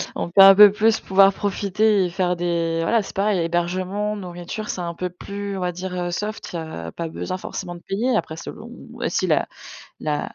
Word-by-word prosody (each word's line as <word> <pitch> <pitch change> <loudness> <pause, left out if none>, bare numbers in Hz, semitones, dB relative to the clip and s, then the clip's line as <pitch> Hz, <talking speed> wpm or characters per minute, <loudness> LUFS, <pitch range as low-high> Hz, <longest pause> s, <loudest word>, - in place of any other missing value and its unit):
on - - -3
peut 195 +3 +5
un 195 0 +10
peu 205 +1 +9
plus 220 +2 +2
pouvoir 195 +1 +4
profiter 205 0 +1
et - - -2
faire 180 -1 0
des 170 -1 -1
voilà, 225 +7 +2
c'est 200 - -10
pareil. 200 -1 +1
Hébergement, 185 +5 -1
nourriture, 180 +2 -7
c'est 180 - -3
un 170 -1 -4
peu 180 +2 -4
plus, 200 +2 -6
on - - -4
va 180 0 -1
dire, 180 +1 -6
heu, 175 0 -2
soft, 210 +4 -5
heu, 170 - -3
il 160 - -5 0.2
y - - -7
a 85 - -6
pas 170 - -5
besoin 185 +3 -5
forcément 180 -1 -6
de 175 - -11
payer. 235 +6 0
Après 160 - -2
selon - - -9 0.4
si - - 0
la - - +1 0.5
la 150 -1 -2
185 Hz, 220 wpm, -22 LUFS, 175-205 Hz, 0.5 s, un